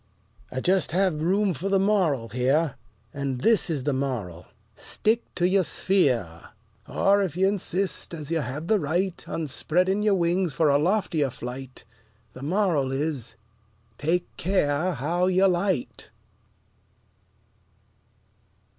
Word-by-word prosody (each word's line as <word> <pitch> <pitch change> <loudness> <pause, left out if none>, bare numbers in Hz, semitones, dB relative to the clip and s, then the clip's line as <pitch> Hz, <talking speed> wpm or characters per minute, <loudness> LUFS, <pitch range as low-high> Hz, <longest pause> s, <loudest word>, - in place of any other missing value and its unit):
I 130 - -3
just 185 -2 +1
have 180 -4 +1
room 195 +3 +2
for 195 +4 -4
the 195 - +3
MORAL 185 - +1
here: 135 +5 +1 0.4
And 135 -3 -3
this 225 -1 +3
is 150 -5 -2
the 145 0 0
moral: 115 -11 -3 0.3
Stick 225 - 0
to 175 - +2
your 190 +1 +3
sphere. 125 - 0 0.4
Or, 200 +1 +3
if 180 -4 -2
you 190 +1 +3
insist, 195 -1 -1
as 155 -2 -7
you 165 - +1
have 145 +3 -4
the 215 +3 +2
right, 175 +4 -1
On 165 - -2
spreading 180 +7 +1
your 210 -1 +3
wings 175 -1 +1
for 155 0 +2
a 140 0 +4
loftier 170 -4 +1
flight, 130 +1 -8 0.5
The 130 - -11
moral 160 -4 +1
is, 140 -3 -2 0.6
Take 170 +4 0
care 175 -1 +1
how 170 +7 0
you 185 +1 +4
light. 180 -5 -1
165 Hz, 135 wpm, -25 LUFS, 140-190 Hz, 0.6 s, a